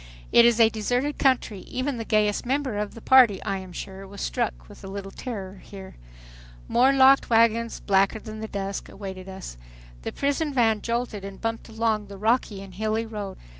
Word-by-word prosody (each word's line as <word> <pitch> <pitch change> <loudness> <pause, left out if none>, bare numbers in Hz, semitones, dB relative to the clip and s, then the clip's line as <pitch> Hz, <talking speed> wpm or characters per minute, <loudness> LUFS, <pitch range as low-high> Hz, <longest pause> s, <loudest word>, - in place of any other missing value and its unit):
It 235 - +7
is 235 -1 +4
a 225 - +8
deserted 245 +6 -1
country. 255 -6 +2
Even 255 +6 -3
the 225 - -3
gayest 210 -2 +1
member 260 -4 -1
of 210 0 -4
the 230 - -10
party, 240 -7 +6
I 195 -1 -2
am 185 -1 -10
sure, 190 +2 -8
was 200 +1 -11
struck - - -2
with - - -14
a - - -7
little 195 0 -6
terror 195 -7 -7
here. 195 -2 -11 0.7
More 255 +3 +4
locked 270 0 +5
wagons, 230 0 +3
blacker 195 +2 +2
than 215 0 -8
the 220 - -5
dusk, 195 -1 -4
awaited 190 -2 -8
us. 190 - -8 0.4
The - - -4
prison 285 +1 -1
van 225 -4 +3
jolted 235 -3 -2
and 195 -1 -8
bumped 225 0 -4
along 220 -2 -1
the 200 0 -10
rocky 215 -2 0
and 195 -1 -12
hilly 220 +3 -1
road. 210 -4 -6
215 Hz, 190 wpm, -25 LUFS, 195-235 Hz, 0.7 s, a